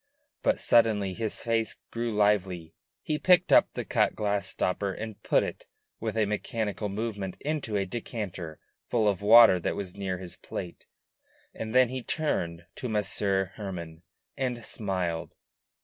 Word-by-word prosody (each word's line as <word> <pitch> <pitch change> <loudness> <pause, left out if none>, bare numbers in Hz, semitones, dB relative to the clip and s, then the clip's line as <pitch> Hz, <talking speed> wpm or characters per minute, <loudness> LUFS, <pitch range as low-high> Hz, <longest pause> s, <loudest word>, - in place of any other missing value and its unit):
But 275 - +2
suddenly 105 -5 +3
his 110 +2 -3
face 115 -1 0 0.2
grew 115 0 -2
lively; 95 -6 +1 0.3
he 150 -1 -1
picked 180 -1 +4
up - - +6
the - - -4
cut - - +2
glass 105 -1 0
stopper 95 +2 -1
and 110 +2 -7
put - - +3
it, - - -6 0.3
with - - -3
a 110 - +3
mechanical 105 0 -2
movement, 100 -2 -4
into 145 -8 -2
a 100 - 0
decanter 95 -6 -5 0.3
full 110 -3 +2
of 100 -3 +1
water 110 -2 +8
that - - -1
was 95 -3 -5
near 95 -2 -2
his 90 -1 -9
plate, 85 - -7 0.7
and 110 +1 -5
then 130 -2 +6
he 130 0 -4
turned 85 - -2
to 125 - -4
Monsieur 100 -3 0
Hermann 85 -6 -6 0.3
and 125 -4 -2
smiled. 90 -6 -3
105 Hz, 150 wpm, -28 LUFS, 95-115 Hz, 0.7 s, water